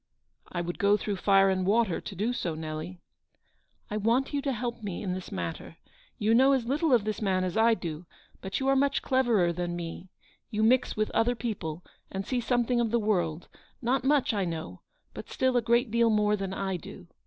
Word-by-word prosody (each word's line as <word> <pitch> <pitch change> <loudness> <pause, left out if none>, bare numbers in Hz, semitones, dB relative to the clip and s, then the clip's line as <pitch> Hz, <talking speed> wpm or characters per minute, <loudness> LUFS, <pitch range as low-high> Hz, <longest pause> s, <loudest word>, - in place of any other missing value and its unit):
" - - -49
I 175 - -2
would 175 0 -5
go 200 +1 +4
through 205 -2 -3
fire 195 0 +4
and 185 -1 0
water 205 -1 +2
to 200 - -8
do 215 +6 -1
so, 170 -9 -3
Nelly." 160 +3 -6 0.4
" - - -42
I 210 - -1
want 235 +7 +1
you 285 - 0
to 275 -1 -1
help 240 -1 -4
me 195 -4 -5
in 185 -3 -2
this 185 0 -6
matter. 85 -2 -5 0.4
You 215 +2 +2
know 265 +4 +6
as 260 -4 +1
little 290 +5 +1
of 240 -5 +4
this 215 +1 -3
man 190 -3 +1
as 180 -1 -2
I 225 +1 +4
do, 165 -3 -6 0.3
but 190 - -3
you 265 - -1
are 270 - +4
much 280 +1 +1
cleverer 235 -10 +2
than 175 0 -3
me. 175 +2 -6 0.4
You 215 0 -1
mix 250 +1 +3
with 215 0 0
other 240 +2 +2
people 190 -8 -4 0.3
and 195 0 -4
see 250 +1 -1
something 240 0 +1
of 235 -1 +1
the 235 - +2
world; 175 -7 -1 0.3
not 255 +2 0
much, 275 -3 +2
I 200 -2 0
know, 160 - -5 0.3
but - - -9
still 260 -1 +1
a 245 - +4
great 235 +1 +2
deal 235 0 +3
more 210 -1 +3
than 195 -2 -4
I 190 -1 -2
do. 150 - -11
210 Hz, 220 wpm, -28 LUFS, 180-240 Hz, 0.4 s, know